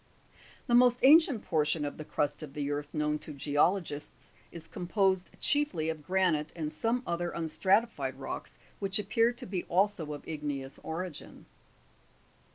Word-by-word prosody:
13. -, -, -27 dB, 0.2 s
The 240 Hz, -, -1 dB
most 245 Hz, 0 st, +6 dB
ancient 280 Hz, -5 st, +6 dB
portion 150 Hz, -1 st, +1 dB
of 145 Hz, -, -4 dB
the -, -, -4 dB
crust 150 Hz, 0 st, -2 dB
of 145 Hz, -3 st, -9 dB
the 145 Hz, -1 st, -2 dB
earth 145 Hz, 0 st, -3 dB
known 150 Hz, -1 st, 0 dB
to 155 Hz, -, -3 dB
geologists 150 Hz, +2 st, -1 dB, 0.2 s
is 165 Hz, -1 st, -9 dB
composed 190 Hz, +2 st, 0 dB
chiefly 290 Hz, -, +1 dB
of 160 Hz, -1 st, -4 dB
granite 180 Hz, -5 st, +1 dB
and 155 Hz, -2 st, -4 dB
some 240 Hz, +2 st, 0 dB
other 170 Hz, 0 st, -2 dB
un 165 Hz, -1 st, -2 dB
stratified 190 Hz, -, +1 dB
rocks 135 Hz, -, -7 dB, 0.2 s
which 195 Hz, -1 st, +1 dB
appear 220 Hz, +3 st, +2 dB
to 245 Hz, +1 st, -8 dB
be 185 Hz, -2 st, -3 dB
also 180 Hz, -4 st, +1 dB
of 145 Hz, -, -9 dB
igneous 145 Hz, -3 st, -5 dB
origin. 165 Hz, 0 st, -6 dB
170 Hz, 160 wpm, -30 LUFS, 150-205 Hz, 0.2 s, most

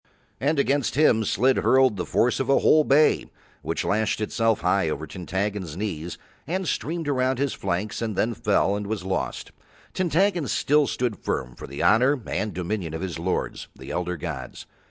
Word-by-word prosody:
And 145 Hz, +3 st, +1 dB
against 140 Hz, -2 st, +1 dB
him 130 Hz, -7 st, +4 dB
Slid 130 Hz, +6 st, +2 dB
hurled 130 Hz, -3 st, +4 dB
the 90 Hz, -, -4 dB
force 120 Hz, -, +2 dB
of 135 Hz, -, -2 dB
a 135 Hz, -, +5 dB
whole 155 Hz, 0 st, +5 dB
bay, 150 Hz, +2 st, +3 dB, 0.3 s
which -, -, -3 dB
lashed 110 Hz, +1 st, 0 dB
itself 115 Hz, 0 st, 0 dB
high 90 Hz, -1 st, +2 dB
over 75 Hz, 0 st, -3 dB
Tintaggon's 95 Hz, +1 st, -4 dB
knees 85 Hz, -5 st, -4 dB, 0.3 s
and 185 Hz, +3 st, -2 dB
streamed 165 Hz, +1 st, -2 dB
around 130 Hz, -2 st, +1 dB
his 140 Hz, 0 st, 0 dB
flanks 95 Hz, +4 st, -3 dB
and 110 Hz, -3 st, -2 dB
then 115 Hz, +5 st, +1 dB
fell 100 Hz, -2 st, +1 dB
and 105 Hz, 0 st, -4 dB
was 105 Hz, -3 st, -3 dB
lost. 95 Hz, 0 st, -3 dB, 0.4 s
Tintaggon 180 Hz, -2 st, +1 dB
still 145 Hz, +6 st, +2 dB
stood 120 Hz, -5 st, -2 dB
firm 60 Hz, -2 st, -2 dB
for -, -, -9 dB
the 70 Hz, +1 st, -5 dB
honour 130 Hz, +6 st, +4 dB
and 110 Hz, -, -2 dB
dominion 90 Hz, -2 st, -3 dB
of 80 Hz, -, -5 dB
his 90 Hz, -3 st, -4 dB
lords, 90 Hz, +2 st, -2 dB
the -, -, -9 dB
elder 90 Hz, 0 st, -2 dB
gods. 70 Hz, -8 st, -6 dB
110 Hz, 175 wpm, -25 LUFS, 90-135 Hz, 0.4 s, a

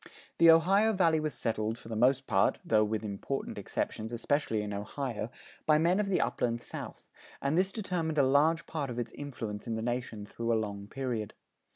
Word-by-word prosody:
The 170 Hz, -, +8 dB
Ohio 195 Hz, +7 st, +5 dB
Valley 165 Hz, -5 st, +3 dB
was 155 Hz, -1 st, -2 dB
settled, 110 Hz, -1 st, -1 dB
for 115 Hz, -, -13 dB
the 115 Hz, -, -4 dB
most 130 Hz, +4 st, +3 dB
part 95 Hz, -, +2 dB
(though 110 Hz, -1 st, +4 dB
with 110 Hz, +1 st, -1 dB
important 105 Hz, +7 st, -4 dB
exceptions, 110 Hz, +1 st, -3 dB
especially 120 Hz, -2 st, 0 dB
in 105 Hz, -1 st, -4 dB
Ohio), 110 Hz, +3 st, -4 dB, 0.4 s
by 155 Hz, -1 st, +6 dB
men 170 Hz, +5 st, +3 dB
of 210 Hz, -, +1 dB
the 195 Hz, -, +2 dB
Upland 120 Hz, -1 st, 0 dB
South, -, -, -8 dB, 0.3 s
and 140 Hz, +3 st, 0 dB
this 190 Hz, +2 st, +2 dB
determined 180 Hz, -7 st, -2 dB
a 140 Hz, -, +5 dB
large 150 Hz, +5 st, +3 dB
part 150 Hz, -4 st, -3 dB
of 120 Hz, -, -5 dB
its 120 Hz, -2 st, -3 dB
influence 115 Hz, -8 st, -6 dB
in 115 Hz, -, -1 dB
the 110 Hz, -, -3 dB
nation 120 Hz, -3 st, -3 dB
through 115 Hz, +2 st, -2 dB
a -, -, +3 dB
long 100 Hz, -2 st, -3 dB
period. 120 Hz, -4 st, -3 dB
125 Hz, 195 wpm, -31 LUFS, 110-160 Hz, 0.4 s, The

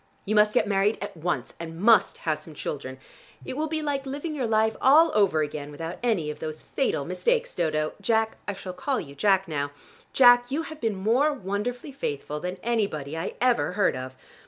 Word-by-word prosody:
You 210 Hz, -, -1 dB
must 210 Hz, 0 st, +4 dB
get 210 Hz, -, +3 dB
married 200 Hz, +1 st, +2 dB
at 200 Hz, -, -6 dB
once, 160 Hz, -6 st, -2 dB
and 165 Hz, 0 st, -7 dB
must 220 Hz, +1 st, +4 dB
have 155 Hz, -2 st, 0 dB
some 160 Hz, -, -12 dB
children. 130 Hz, -2 st, -5 dB, 0.5 s
It -, -, -5 dB
will 310 Hz, +3 st, -1 dB
be 310 Hz, 0 st, -2 dB
like 280 Hz, -2 st, -2 dB
living 290 Hz, +4 st, -4 dB
your 265 Hz, -5 st, -1 dB
life 220 Hz, 0 st, +2 dB
all 310 Hz, +5 st, +6 dB
over 190 Hz, -7 st, +3 dB
again 145 Hz, -1 st, -5 dB
without 165 Hz, +4 st, -6 dB
any 200 Hz, -11 st, 0 dB
of -, -, -10 dB
those 155 Hz, 0 st, -5 dB
fatal 270 Hz, -, -1 dB
mistakes, -, -, 0 dB
Dodo. 155 Hz, -2 st, 0 dB
Jack 220 Hz, +1 st, +1 dB
I 205 Hz, -, -2 dB
shall 185 Hz, -1 st, -7 dB
call 265 Hz, +9 st, -1 dB
you 140 Hz, -3 st, -8 dB
Jack 195 Hz, +5 st, +2 dB
now 145 Hz, -3 st, -2 dB, 0.4 s
Jack, 245 Hz, -1 st, +6 dB
you 295 Hz, +4 st, -1 dB
have 315 Hz, -1 st, -9 dB
been 225 Hz, -3 st, 0 dB
more 235 Hz, +10 st, +2 dB
wonderfully 240 Hz, +4 st, -4 dB
faithful 150 Hz, -, -4 dB
than 180 Hz, +3 st, -4 dB
anybody 200 Hz, -11 st, -1 dB
I 165 Hz, +2 st, -4 dB
ever 245 Hz, -7 st, +2 dB
heard 200 Hz, -6 st, +2 dB
of. 130 Hz, 0 st, -6 dB
205 Hz, 200 wpm, -26 LUFS, 160-245 Hz, 0.5 s, all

